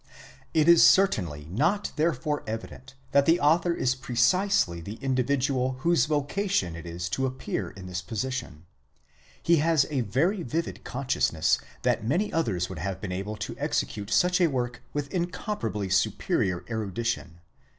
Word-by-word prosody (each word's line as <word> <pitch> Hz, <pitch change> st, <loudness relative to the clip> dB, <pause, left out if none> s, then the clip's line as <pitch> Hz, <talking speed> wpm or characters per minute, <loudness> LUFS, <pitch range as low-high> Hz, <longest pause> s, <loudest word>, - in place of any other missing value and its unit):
It 155 Hz, -1 st, +3 dB
is 170 Hz, -1 st, +8 dB
certainly 90 Hz, -, +3 dB
not 195 Hz, -, +1 dB
therefore 150 Hz, -2 st, 0 dB
evident 115 Hz, +5 st, -7 dB, 0.2 s
that 140 Hz, -1 st, +4 dB
the 165 Hz, +2 st, +5 dB
author 165 Hz, +4 st, +3 dB
is 130 Hz, -7 st, +1 dB
precisely 130 Hz, -, +1 dB
the 100 Hz, +5 st, -6 dB
indi 130 Hz, +1 st, 0 dB
vidual 130 Hz, -1 st, 0 dB
whose 165 Hz, -5 st, +3 dB
vocation 150 Hz, -, 0 dB
it 85 Hz, 0 st, -8 dB
is 85 Hz, +1 st, -4 dB
to 130 Hz, +8 st, 0 dB
appear 130 Hz, 0 st, -4 dB
in 95 Hz, -, -11 dB
this 90 Hz, 0 st, -4 dB
position. 105 Hz, -, -4 dB, 0.8 s
He 170 Hz, 0 st, +4 dB
has 155 Hz, -2 st, +3 dB
a 135 Hz, -3 st, +1 dB
very 160 Hz, -, +1 dB
vivid 165 Hz, +4 st, -3 dB
consciousness 125 Hz, -, +1 dB, 0.2 s
that -, -, +1 dB
many 170 Hz, -, 0 dB
others 100 Hz, -, 0 dB
would 95 Hz, -4 st, -7 dB
have 95 Hz, +2 st, -3 dB
been 95 Hz, -2 st, -5 dB
able 100 Hz, +4 st, -4 dB
to 105 Hz, -, -5 dB
execute 100 Hz, -1 st, -2 dB
such 180 Hz, -, +3 dB
a 175 Hz, -, +6 dB
work 125 Hz, -4 st, -3 dB
with 145 Hz, -1 st, -4 dB
incomparably 175 Hz, -, -3 dB
superior 95 Hz, -1 st, +1 dB
erudition. 110 Hz, -5 st, -3 dB
130 Hz, 150 wpm, -27 LUFS, 100-165 Hz, 0.8 s, is